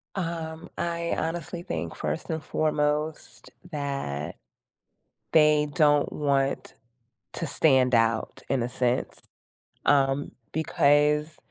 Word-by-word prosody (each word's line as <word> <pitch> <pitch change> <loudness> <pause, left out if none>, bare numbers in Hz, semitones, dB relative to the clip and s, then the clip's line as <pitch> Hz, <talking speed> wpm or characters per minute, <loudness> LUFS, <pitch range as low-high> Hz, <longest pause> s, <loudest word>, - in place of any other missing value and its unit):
Um, 165 -3 -4
I 170 0 -1
honestly 170 +1 -3
think, 85 - -4
first 75 0 -3
and 160 -1 -3
foremost, 150 0 -1 0.2
that 140 - -3 1.0
they 150 -1 +5
don't 145 -3 +3
want 140 -2 0 0.6
to 165 - -3
stand 130 -4 +3
out 115 -1 +1
in 130 - +1
a 120 - -1
sense, 125 0 -1 0.7
um, 140 0 +2 0.2
because 150 0 +2
150 Hz, 100 wpm, -26 LUFS, 135-160 Hz, 1.0 s, they